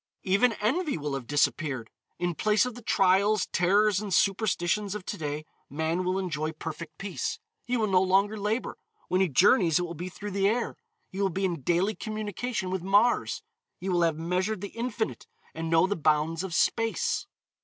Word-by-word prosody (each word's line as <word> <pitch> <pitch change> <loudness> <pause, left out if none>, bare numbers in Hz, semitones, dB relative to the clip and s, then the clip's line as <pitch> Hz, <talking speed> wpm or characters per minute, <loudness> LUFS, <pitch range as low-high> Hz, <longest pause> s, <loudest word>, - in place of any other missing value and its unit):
Even 200 +5 +3
envy 280 - 0
will 145 -2 -3
have 135 -3 -4
disappeared. 145 -4 0 0.3
In 175 0 -1
place 210 +7 +2
of 250 - -4
the 245 - -10
trials, 195 0 +3
terrors 195 +3 +3
and 205 -2 -5
superstitions 195 +1 +1
of 205 -3 -6
to - - -3
day, 150 0 -4 0.2
man 160 +5 -1
will 185 +1 0
enjoy 160 -4 -2
perfect 155 0 -7
peace. 440 - -3 0.3
He 250 0 0
will 220 - +1
no 190 -3 +3
longer 195 +3 +3
labor. 215 +3 -2 0.3
When 185 +1 +2
he 190 - +3
journeys 175 - +4
it 180 - 0
will 170 -1 -5
be 175 +3 -6
through 205 +3 -7
the 195 +1 +2
air. 235 +3 -1 0.4
He 195 - -4
will 195 - +2
be 190 +2 -1
in 170 -5 -2
daily 175 +9 +1
communication 215 -1 -4
with 190 -1 -2
Mars, 205 +6 +2 0.3
he 190 - -5
will 175 -1 +2
have 165 -2 +2
measured 180 +5 -1
the 200 - -5
Infinite 230 -2 -3 0.3
and 165 0 -4
know 165 +2 +5
the 205 +2 -1
bounds 155 +1 +1
of 185 -3 -4
Space. 225 -1 +1
190 Hz, 185 wpm, -28 LUFS, 165-210 Hz, 0.4 s, know